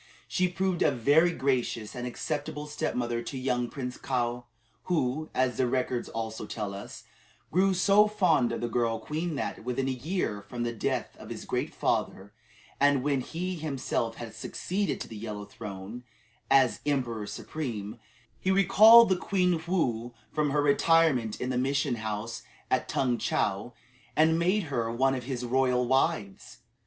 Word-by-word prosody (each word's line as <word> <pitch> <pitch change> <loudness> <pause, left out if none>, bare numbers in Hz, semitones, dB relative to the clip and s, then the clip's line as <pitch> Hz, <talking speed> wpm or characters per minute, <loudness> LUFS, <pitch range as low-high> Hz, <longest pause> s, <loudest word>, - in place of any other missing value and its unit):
She 185 -1 +1
proved 185 0 -1
a - - +5
very 145 +7 +4
gracious 130 -7 -1
and 125 0 -4
acceptable 150 +3 -4
stepmother 125 -6 -2
to 125 +3 -6
young 125 -2 -1
Prince 125 -3 -5
Kaou, 120 -2 -2 0.4
who, 155 -2 0
as 130 -3 +1
the 130 - +2
records 125 -1 -1
also 110 -1 -5
tell 105 -3 -4
us, 100 +1 -9 0.5
grew 190 +3 +3
so 200 +3 +5
fond 185 - +2
of 115 - -3
the 120 - -1
girl 115 -1 0
queen 155 +6 -3
that, 140 - -4
within 125 +2 -1
a - - +1
year 130 - -2
from 120 +4 -5
the 120 0 -2
death 110 - -2
of - - -11
his - - -7
great - - -2
father, 100 +2 -1 0.5
and 140 -2 +4
when 140 -2 +1
he 180 +7 -4
himself 135 -6 -2
had 115 -2 -8
succeeded 185 - -2
to - - -5
the 110 - -9
Yellow 105 -1 -6
Throne, 100 +4 -8 0.5
as 135 -3 +4
Emperor 120 -7 -1
Supreme, 110 -1 -5 0.4
he 185 - -1
recalled 215 +4 +8
the 190 - +4
Queen 180 -3 +1
Woo 120 -10 -1 0.2
from 150 -1 +1
her 145 +1 +1
retirement 145 -6 +3
in 125 +1 -2
the 125 - 0
mission 135 -1 0
house 110 +1 -4 0.3
at - - +1
Tung 125 -3 +1
Chow 105 +5 -1 0.4
and 160 +1 +4
made 185 +5 +2
her 120 -7 -2
one 135 +3 +2
of 125 -2 -4
his 125 -2 -3
royal 125 0 +2
wives. 110 -6 0
130 Hz, 165 wpm, -28 LUFS, 115-155 Hz, 0.5 s, recalled